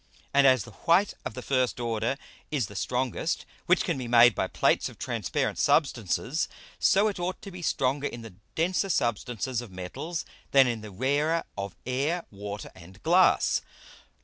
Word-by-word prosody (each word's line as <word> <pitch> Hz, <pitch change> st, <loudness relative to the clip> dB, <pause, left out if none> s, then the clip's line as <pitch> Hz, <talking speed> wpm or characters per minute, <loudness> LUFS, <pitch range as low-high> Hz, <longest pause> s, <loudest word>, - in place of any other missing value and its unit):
And 140 Hz, -1 st, +6 dB
as 130 Hz, -4 st, +5 dB
the 120 Hz, -, -12 dB
white 175 Hz, -, +2 dB
of -, -, -4 dB
the 125 Hz, -, -6 dB
first 130 Hz, -2 st, 0 dB
order 115 Hz, +2 st, -1 dB, 0.3 s
is 140 Hz, -7 st, 0 dB
the 100 Hz, -, -11 dB
strongest 125 Hz, -, -1 dB, 0.2 s
which 180 Hz, -, +4 dB
can 165 Hz, -6 st, -1 dB
be 125 Hz, -, -4 dB
made 120 Hz, 0 st, +7 dB
by -, -, -1 dB
Plates -, -, +2 dB
of -, -, -14 dB
transparent -, -, -2 dB
Substances, 130 Hz, -, +1 dB, 0.3 s
so 200 Hz, +3 st, +4 dB
it 205 Hz, -3 st, -3 dB
ought 180 Hz, +1 st, -2 dB
to 200 Hz, -, -8 dB
be 180 Hz, 0 st, -8 dB
stronger 140 Hz, -2 st, 0 dB
in 120 Hz, -4 st, -7 dB
the 110 Hz, -4 st, -10 dB, 0.2 s
denser 180 Hz, +4 st, +1 dB
Substances 120 Hz, -, -1 dB
of 120 Hz, -, -9 dB
Metals 135 Hz, -, -5 dB, 0.3 s
than 135 Hz, -1 st, +8 dB
in 120 Hz, -3 st, -1 dB
the 105 Hz, -, -8 dB
rarer 145 Hz, -, +1 dB
of 100 Hz, -3 st, -5 dB
Air, 140 Hz, +8 st, -1 dB
Water, 100 Hz, 0 st, -7 dB
and 90 Hz, +1 st, -15 dB
Glass. -, -, +4 dB
130 Hz, 175 wpm, -28 LUFS, 115-160 Hz, 0.3 s, than